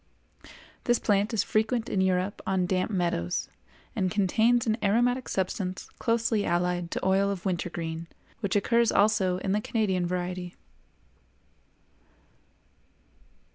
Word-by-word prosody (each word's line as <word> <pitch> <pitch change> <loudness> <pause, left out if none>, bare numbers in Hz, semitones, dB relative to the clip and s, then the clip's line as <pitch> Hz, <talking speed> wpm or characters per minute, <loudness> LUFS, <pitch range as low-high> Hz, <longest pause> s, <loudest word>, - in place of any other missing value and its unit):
This 240 -1 +3
plant 205 0 +1
is 225 - +1
frequent 220 +2 0
in 190 - 0
Europe 190 +1 0
on 190 -1 +1
damp 185 +2 0
meadows, 170 - -1 0.5
and 185 - +1
contains 220 +5 +2
an 220 0 0
aromatic 245 +5 +2
substance 185 0 -3
closely 230 -2 +1
allied 175 -1 0
to - - -3
oil 195 +1 +3
of 195 -2 -4
wintergreen, 170 -2 -3 0.3
which 200 -2 -2
occurs 230 +3 +3
also 200 -3 +3
in 190 +1 -2
the 210 +2 +1
Canadian 190 -6 0
variety. 180 0 -4
190 Hz, 120 wpm, -27 LUFS, 180-220 Hz, 0.5 s, This